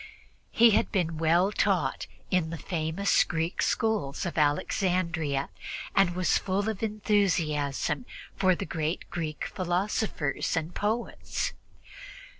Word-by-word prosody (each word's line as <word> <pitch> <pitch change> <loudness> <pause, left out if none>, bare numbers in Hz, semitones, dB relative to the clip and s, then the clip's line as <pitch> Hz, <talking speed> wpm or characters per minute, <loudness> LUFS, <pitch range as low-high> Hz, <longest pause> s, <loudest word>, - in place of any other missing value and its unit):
He 230 0 +6
had 205 - +2
been 165 -5 0
well 170 +5 +3
taught - - 0 0.2
in 180 -4 +2
the 165 - -5
famous 160 +4 +1
Greek 165 +1 -2
schools 210 -12 0
of 175 - -3
Alexandria 160 -1 +1 0.5
and 185 -3 +4
was 185 -1 +2
full 195 +2 -1
of 220 -3 -2
enthusiasm 200 - 0 0.3
for 185 -2 +3
the 195 - -4
great 160 -1 -2
Greek 155 -3 -3
philosophers 180 -4 -1
and 160 +2 -2
poets. 220 +5 -2
175 Hz, 115 wpm, -28 LUFS, 160-200 Hz, 0.5 s, He